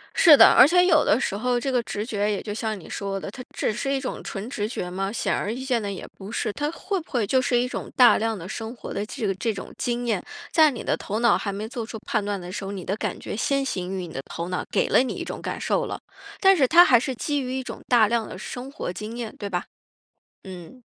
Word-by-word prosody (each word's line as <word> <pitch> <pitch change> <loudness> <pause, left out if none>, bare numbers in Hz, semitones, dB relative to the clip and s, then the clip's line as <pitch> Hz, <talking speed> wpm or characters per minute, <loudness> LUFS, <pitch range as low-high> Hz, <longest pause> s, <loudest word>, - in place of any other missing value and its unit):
是 305 -5 +8
的。 - - +10
而 260 - +8
且 360 +3 +5
有 320 -4 +5
的 215 - +3
时 200 - -1
候 245 +3 0
这 270 +2 -2
个 250 - +2
直 210 -2 -4
觉 210 -3 -1
也 200 - -2
就 205 - -5
像 220 -1 -3
你 - - -13
说 195 -1 -3
的， 195 - -6
它 250 +3 -9
只 - - 0
是 275 +5 -2
一 275 - +1
种 260 - -5
纯 200 +5 -6
直 210 -6 -2
觉 180 -5 -4
吗？ 195 +2 -3
显 230 - -1
而 205 - -2
易 255 +2 -6
见 250 -3 +1
的 200 -1 -3
也 195 - -7
不 195 +2 -9
是。 220 - -1
它 295 +5 -2
会 390 +2 -3
不 325 - -14
会 240 -5 +1
就 260 +6 +2
是 255 -2 +1
一 250 - 0
种 - - -6
大 250 -3 +7
量 225 -1 -1
的 175 0 -8
生 225 +4 -6
活 - - -8
的 205 - -2
这 225 +1 -5
个 195 - +1
这 225 +3 -1
种 195 - -8
经 245 -1 -2
验， 215 -5 0 0.3
在 315 -2 +6
你 245 - -6
的 - - +1
头 215 +2 -3
脑 235 0 +4
还 200 - -3
没 205 +2 -5
做 235 -2 -5
出 220 - -7
判 215 -3 0
断 205 -1 -2
的 180 0 -8
时 195 - -5
候， 195 - -4
你 190 -3 -6
的 195 - -1
感 - - -3
觉 - - -5
先 275 +4 0
行 185 -7 -3
于 180 - -4
你 - - -11
的 135 - -4
头 170 +2 -6
脑， 180 - -2
给 - - +2
了 - - +5
你 260 - -3
一 - - -4
种 - - -6
感 - - -4
受 - - 0
了， - - -5 0.4
但 385 0 +6
是 275 -7 +3
它 345 +6 +8
还 240 -3 +6
是 260 +1 -3
基 290 +3 -1
于 260 0 -3
一 260 - -3
种 - - -8
大 235 -4 +5
量 230 0 0
的 - - -8
生 250 +6 -7
活 180 - -5
经 215 +5 -6
验， 235 -3 -5
对 200 - -5
吧？ 180 -1 -2 0.8
嗯。 190 +7 -11
225 Hz, 305 characters per minute, -24 LUFS, 200-260 Hz, 0.8 s, 的